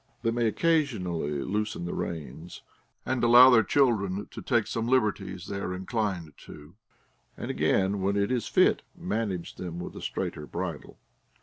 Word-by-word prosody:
They 115 - +2
may 120 0 +1
occasionally 95 - 0
loosen 105 -3 -2
the 85 - -4
reins, 85 +1 -6 0.4
and 130 -2 -1
allow 120 +2 +9
their 120 -2 +7
children 105 -5 +1
to - - -8
take 120 -4 +1
some 115 0 -3
liberties 100 -7 0
they 100 +1 -4
are 90 -1 -3
inclined 95 -5 -3
to, 75 +2 -13 0.6
and - - -4
again, 95 +1 +1
when 100 +1 +1
it 100 +2 +1
is 125 -2 -1
fit, 185 - +3 0.2
manage 110 - -3
them 85 -2 -6
with 90 - -7
a - - -8
straighter 75 -1 -4
bridle. - - -5
100 Hz, 160 wpm, -28 LUFS, 90-120 Hz, 0.6 s, allow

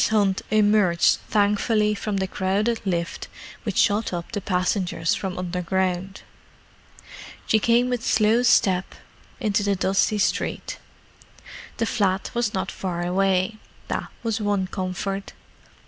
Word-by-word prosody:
Hunt 200 -3 +2
emerged 205 -5 +3
thankfully 210 +1 +2
from 210 0 -3
the 190 - 0
crowded 200 +5 -1
lift 170 -2 -2 0.3
which - - -4
shot 210 +1 +2
up 170 -2 -5
the 205 -3 -3
passengers 180 -2 0
from 190 -2 -3
underground. 180 +1 -2 1.2
She 220 - +3
came 235 +3 +3
with 245 -2 -2
slow 220 +2 +3
step 190 -6 +3 0.4
into 210 -4 +1
the 200 -1 +1
dusty 195 +3 +1
street. 200 - -1 1.0
The 230 - 0
flat 195 -4 0
was 235 -3 0
not 190 - -2
far 175 -2 -3
away: 190 +3 +1 0.3
that - - -2 0.2
was 225 -1 -1
one 205 -2 +1
comfort. 190 +1 -4
195 Hz, 125 wpm, -24 LUFS, 185-215 Hz, 1.2 s, emerged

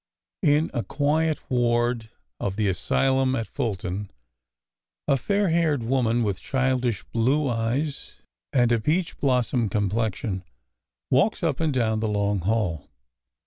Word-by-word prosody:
In 150 +2 +3
a 120 - 0
quiet 155 +2 0
ward 120 -2 +1 0.3
of 95 -1 -2
the 105 -1 +1
asylum 130 +7 +1
at 115 - -2
Fulton 100 -5 -3 1.0
a 140 - +4
fair 200 +7 +1
haired 160 -6 +2
woman 120 -1 +1
with 100 -3 -2
childish 130 -5 0
blue 135 +6 +2
eyes 125 +5 -2 0.3
and 120 -3 +3
a 120 - +3
peach 165 +10 0
blossom 125 -4 +1
com 100 -1 0
plexion 105 -3 -1 0.7
walks 175 +10 +2
up 155 -5 0
and 160 -2 +1
down 110 -4 +1
the 110 - -1
long 100 -1 0
hall. 90 -5 -1
120 Hz, 135 wpm, -25 LUFS, 110-140 Hz, 1.0 s, a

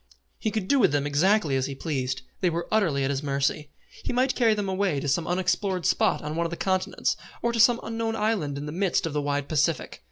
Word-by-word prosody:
He 220 - 0
could 215 -3 -3
do 280 - +3
with 230 - +4
them 145 -1 +1
exactly 155 +1 +2
as 130 0 0
he 140 - -5
pleased. 135 -3 -3 0.2
They 180 - +2
were 170 +1 -3
utterly 170 -11 +2
at 135 - 0
his 135 -1 -2
mercy. 140 +1 -1 0.3
He - - -2
might 255 +2 +2
carry 230 -3 +3
them 205 -2 -2
away 190 -5 0
to 145 - -4
some 155 +4 0
unexplored 180 0 0
spot - - +2
on 150 +1 -4
one 170 0 0
of - - -8
the 170 - -5
continents, 185 -1 0 0.3
or 235 0 +1
to 230 - -1
some 235 +2 +6
unknown 225 0 -2
island 210 -10 -1
in 145 - -5
the 150 - -5
midst 185 +2 0
of 165 - -3
the 150 - 0
wide 145 0 -1
Pacific. 155 -4 0
170 Hz, 245 wpm, -26 LUFS, 145-210 Hz, 0.3 s, some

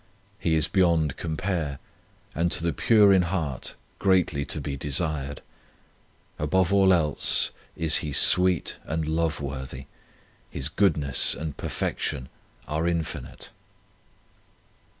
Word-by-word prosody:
He 80 - 0
is 80 -2 +2
beyond 85 -6 +1
compare, 80 -3 -3 0.6
and 85 +2 -1
to 85 - +2
the 85 -2 0
pure 105 - +4
in 95 - +4
heart 85 -7 -3 0.2
greatly 90 -7 +1
to 75 - -2
be 70 -1 -5
desired. 70 0 -3 1.0
Above 90 +5 +1
all 95 -1 +4
else 80 -5 +3 0.3
is 80 -2 +5
He 75 - -4
sweet 90 +5 +4
and 80 -1 -3
love 80 0 -1
worthy; 65 -1 -7 0.6
His 70 +2 -3
goodness 75 -8 +2
and 75 -2 -6
perfection 65 - -4 0.4
are 80 +2 -2
infinite. 85 -2 -5
80 Hz, 115 wpm, -25 LUFS, 75-90 Hz, 1.0 s, is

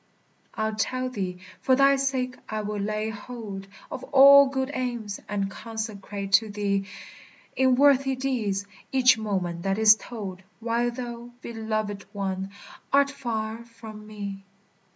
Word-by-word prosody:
I'll 220 0 -1
tell 255 +4 -1
thee; 185 -6 -3 0.2
for 260 - +4
thy 275 +1 +5
sake 260 -2 -1
I 215 0 -2
will 210 0 -3
lay 215 +2 -1
hold 210 -3 -7 0.2
Of - - -5
all 280 0 +8
good 265 0 -2
aims, 240 -6 -3
and 200 -1 -1
consecrate 205 -3 -5
to 215 +3 +5
thee, 200 -1 -1 0.7
In 260 -1 +4
worthy 275 0 +4
deeds, 230 -7 -1 0.3
each 255 -2 +5
moment 185 -5 -2
that 195 +2 0
is 215 -1 +8
told 200 -5 -7 0.2
While 235 +1 0
thou, 240 -1 -6
belovèd 215 -3 -3
one! 195 -1 -3 0.4
art 280 0 +4
far 230 -4 -4
from 220 -2 -11
me. 200 -2 -6
220 Hz, 135 wpm, -26 LUFS, 205-255 Hz, 0.7 s, all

